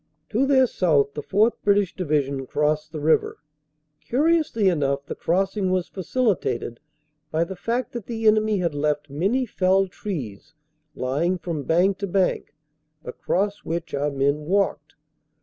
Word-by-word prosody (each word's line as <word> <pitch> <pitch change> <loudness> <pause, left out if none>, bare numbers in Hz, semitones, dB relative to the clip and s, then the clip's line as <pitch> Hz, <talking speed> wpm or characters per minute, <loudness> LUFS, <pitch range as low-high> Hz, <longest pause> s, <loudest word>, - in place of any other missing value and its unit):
"To 260 +5 +1
their 265 -2 +5
south 150 - +1
the 150 - -4
4th. 210 +8 +2
British 200 -2 +2
Division 140 -6 -1
crossed 150 +2 0
the 155 - -5
river. 155 +2 +2 0.7
Curiously 295 -6 +2
enough 140 -5 +1
the - - -5
crossing 195 +2 0
was 185 -1 0
facilitated 190 - -1 0.5
by 160 +2 +1
the 190 +3 -6
fact 235 +7 -2
that 235 -5 -7
the 225 -1 -4
enemy 215 -1 +4
had 170 -4 -1
left 145 0 -1
many 200 - 0
felled 190 -3 +1
trees 155 - -6 0.4
lying 150 +8 0
from 165 -5 -5
bank 185 +4 +2
to 200 - -2
bank, 185 -4 0 0.5
across 200 +10 -1
which 170 0 -5
our 145 +1 0
men 140 +2 0
walked. 185 -6 0
180 Hz, 145 wpm, -24 LUFS, 150-205 Hz, 0.7 s, their